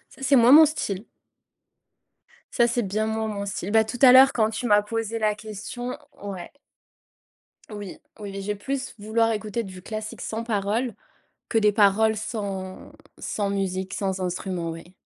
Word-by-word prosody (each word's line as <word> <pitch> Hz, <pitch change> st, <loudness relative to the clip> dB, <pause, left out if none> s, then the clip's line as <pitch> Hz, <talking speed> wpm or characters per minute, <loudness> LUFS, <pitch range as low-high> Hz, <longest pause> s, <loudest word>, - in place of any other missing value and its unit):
Ça, -, -, -17 dB
c'est 275 Hz, +1 st, +3 dB
moins 240 Hz, -1 st, +6 dB
mon 310 Hz, +3 st, +10 dB
style. 215 Hz, -9 st, -3 dB, 1.5 s
Ça 235 Hz, -2 st, +4 dB
c'est 240 Hz, 0 st, 0 dB
bien 210 Hz, +2 st, -1 dB
moins 220 Hz, 0 st, -2 dB
mon 200 Hz, -1 st, -4 dB
style. 200 Hz, -1 st, -4 dB
Ben 220 Hz, 0 st, +5 dB
tout 220 Hz, +3 st, -6 dB
à 255 Hz, -, +10 dB
l'heure 265 Hz, +2 st, +8 dB
quand 220 Hz, -4 st, +1 dB
tu 235 Hz, +2 st, -3 dB
m'as 205 Hz, -1 st, +5 dB
posé 225 Hz, +1 st, -3 dB
la 215 Hz, -1 st, +1 dB
question 215 Hz, +4 st, -7 dB, 0.2 s
ouais. 195 Hz, -3 st, -7 dB, 1.2 s
Oui, 205 Hz, -3 st, -7 dB, 0.2 s
oui 200 Hz, -2 st, -7 dB
et 195 Hz, -, -4 dB
j'ai 205 Hz, +1 st, -3 dB
plus, 265 Hz, +5 st, -4 dB
vouloir 225 Hz, +2 st, +1 dB
écouter 215 Hz, +1 st, -3 dB
du 185 Hz, -3 st, -10 dB
classique 215 Hz, +2 st, -6 dB
sans 225 Hz, +1 st, -4 dB
paroles, 225 Hz, +2 st, -1 dB, 0.6 s
que 225 Hz, -, +2 dB
des 210 Hz, -1 st, +4 dB
paroles 215 Hz, +1 st, +4 dB
sans 200 Hz, -4 st, -5 dB, 0.3 s
sans 205 Hz, -2 st, -2 dB
musique, 190 Hz, 0 st, -2 dB
sans 190 Hz, -2 st, -2 dB
instrument, 180 Hz, -1 st, -3 dB
oui. 165 Hz, +3 st, -10 dB
215 Hz, 165 wpm, -25 LUFS, 195-230 Hz, 1.5 s, mon